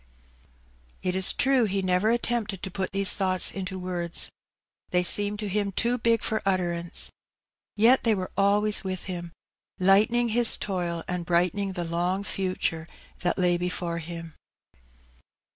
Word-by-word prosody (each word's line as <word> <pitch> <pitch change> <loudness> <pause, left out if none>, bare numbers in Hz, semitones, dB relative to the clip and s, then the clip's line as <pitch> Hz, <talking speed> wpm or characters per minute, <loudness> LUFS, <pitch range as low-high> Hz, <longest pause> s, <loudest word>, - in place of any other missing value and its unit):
It 180 0 -1
is 190 -1 +5
true 265 -3 +2
he 195 -1 -2
never 185 +3 +1
attempted 230 -4 -1
to 190 - -5
put 190 0 -3
these 195 0 +3
thoughts 185 -2 +3
into 190 -1 -5
words. 175 -2 0 0.6
They 180 0 +1
seemed 205 +3 +4
to 210 0 -4
him 200 0 -2
too 240 +5 +1
big 230 -1 +1
for 220 - 0
utterance; 175 -3 0 0.6
yet 235 +5 +4
they 225 -2 +2
were 185 -2 -5
always 205 +2 +2
with 185 -1 -4
him, 175 -2 -6 0.5
lightening 215 +6 +3
his 235 +1 +4
toil 175 -4 -3
and 180 -1 -3
brightening 180 +3 0
the 175 -2 -4
long 175 +3 -2
future 185 -5 -3 0.3
that 175 - -1
lay 180 -2 +2
before 175 -1 -3
him. 165 0 -8
190 Hz, 145 wpm, -26 LUFS, 175-210 Hz, 0.6 s, is